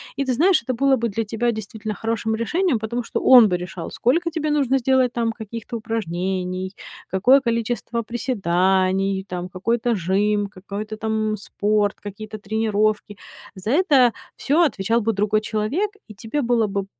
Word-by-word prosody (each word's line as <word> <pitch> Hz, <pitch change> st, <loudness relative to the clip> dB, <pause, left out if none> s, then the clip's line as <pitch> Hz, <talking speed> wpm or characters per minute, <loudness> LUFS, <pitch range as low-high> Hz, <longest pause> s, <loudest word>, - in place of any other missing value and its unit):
И 275 Hz, -, -1 dB
ты 260 Hz, -, +1 dB
знаешь, 340 Hz, +7 st, +4 dB
это 255 Hz, -, -2 dB
было 270 Hz, +2 st, +3 dB
бы 235 Hz, -2 st, -1 dB
для 225 Hz, +2 st, -2 dB
тебя 230 Hz, +2 st, -1 dB
действительно 220 Hz, 0 st, -5 dB
хорошим 225 Hz, 0 st, -2 dB
решением, 285 Hz, -, 0 dB
потому 235 Hz, +3 st, -3 dB
что -, -, -3 dB
он 245 Hz, -4 st, +8 dB
бы 180 Hz, -3 st, 0 dB
решал, 175 Hz, -1 st, -7 dB
сколько 335 Hz, +7 st, +1 dB
тебе 310 Hz, -1 st, -2 dB
нужно 270 Hz, -3 st, +2 dB
сделать 255 Hz, -1 st, +2 dB
там 230 Hz, -1 st, 0 dB
каких-то 225 Hz, +1 st, -7 dB
упражнений, 185 Hz, -3 st, -3 dB, 0.4 s
какое 245 Hz, +9 st, +5 dB
количество 235 Hz, -1 st, -2 dB
приседаний, 190 Hz, -4 st, 0 dB
там, 180 Hz, -1 st, -5 dB
какой-то 230 Hz, +6 st, 0 dB
жим, 205 Hz, +3 st, +1 dB
какой-то 205 Hz, +2 st, -7 dB
там 220 Hz, -1 st, -1 dB
спорт, 205 Hz, 0 st, 0 dB
какие-то 210 Hz, +1 st, -7 dB
тренировки. 215 Hz, -1 st, 0 dB, 0.4 s
За 190 Hz, +3 st, -6 dB
это 280 Hz, -7 st, +4 dB, 0.2 s
всё 305 Hz, +5 st, +2 dB
отвечал 230 Hz, -, +1 dB
бы 225 Hz, +1 st, 0 dB
другой 210 Hz, +1 st, +1 dB
человек, 220 Hz, -, -1 dB, 0.2 s
и 215 Hz, -, -12 dB
тебе 225 Hz, +8 st, -3 dB
было 235 Hz, -3 st, +2 dB
бы, 200 Hz, -1 st, -2 dB
220 Hz, 160 wpm, -22 LUFS, 200-240 Hz, 0.4 s, он